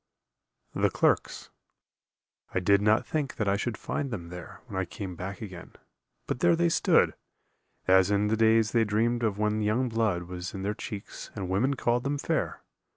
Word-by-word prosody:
The - - +2
Clerks - - 0 1.0
I - - +3
did 100 +2 +4
not 105 +2 +3
think 150 -4 -2
that 105 - -1
I 100 - +3
should 110 +3 -2
find 140 -2 -3
them 90 -8 -6
there 90 -1 -9
When 110 -6 -9
I - - 0
came 90 +1 -6
back 95 +4 -6
again; 90 -5 -9 0.5
but - - -3
there 175 -1 +4
they 170 +1 +2
stood, - - +3 0.7
As 95 0 +5
in 105 0 +2
the 110 - +2
days 110 0 +4
they 115 -1 +3
dreamed 115 +3 +1
of 110 -4 0
when 105 0 0
young 115 +5 +1
blood 110 -6 0
Was 90 +1 -6
in 95 - -5
their 105 +2 0
cheeks 105 -1 -7
and 95 -4 -4
women 125 +9 +1
called 120 -1 +1
them 140 +1 -1
fair. - - -2
105 Hz, 185 wpm, -28 LUFS, 95-120 Hz, 1.0 s, As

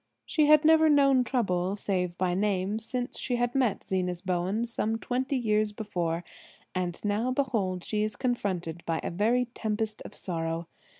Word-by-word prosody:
She 305 -3 +2
had 305 0 +6
never 320 0 +6
known 275 -3 +5
trouble, 195 -7 0
save 180 -4 -2
by 180 -1 +1
name, 200 +1 0
since 245 +2 -4
she 245 -2 -1
met 250 -7 +1
Zenas 180 -1 -2
Bowen 185 +5 0
some 225 -1 -1
twenty 255 +4 -1
years 215 -3 +1
before; 175 -6 -2 0.5
and 180 -2 -2
now 210 +4 +1
behold, 225 -9 0
she 210 -1 -1
is 215 -1 -1
confronted 185 - -2
by 165 -1 0
a - - -2
very 225 +8 +2
tempest 215 0 -2
of - - -10
sorrow. 165 -2 -3
210 Hz, 160 wpm, -28 LUFS, 180-245 Hz, 0.5 s, had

